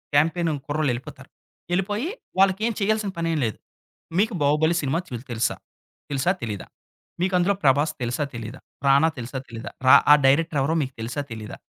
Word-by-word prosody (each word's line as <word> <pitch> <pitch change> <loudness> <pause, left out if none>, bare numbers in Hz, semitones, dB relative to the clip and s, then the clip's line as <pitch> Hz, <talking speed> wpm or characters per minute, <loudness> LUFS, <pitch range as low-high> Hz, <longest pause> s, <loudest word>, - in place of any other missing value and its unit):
Campaign 165 +3 +3 0.2
కుర్రోళ్ళు 150 -2 0
ఎళ్ళిపోతారు. 120 +2 -9 0.4
ఎళ్ళిపోయి 205 - 0 0.3
వాళ్ళకి 195 +1 +4
ఏం 235 - -1
చేయాల్సిన 215 0 +1
పనేంలేదు. 160 - -1 0.6
"మీకు 220 +1 +2
'బాహుబలి' 155 +4 +3
సినిమా 145 +4 0
చు 120 -2 -5
తెలుసా. 115 0 0 0.6
తెలుసా 140 +6 +2
తెలీదా? 105 -4 -5 0.5
మీకు 185 +1 +1
అందులో 185 +3 +3
'ప్రభాస్' 145 +3 +3
తెలుసా 120 +5 -1
తెలీదా? 115 +3 -7 0.3
రానా 140 +4 +5
తెలుసా 125 +3 -5
తెలియదా? 115 -1 -8 0.2
ర - - +7 0.2
ఆహ్, 150 - +6
డైరెక్టర్ 150 +1 +3
ఎవరో 155 +4 +1
మీకు 130 - -6
తెలుసా 125 +6 -3
తెలీదా?" 110 -1 -8
150 Hz, 155 wpm, -24 LUFS, 130-175 Hz, 0.6 s, ర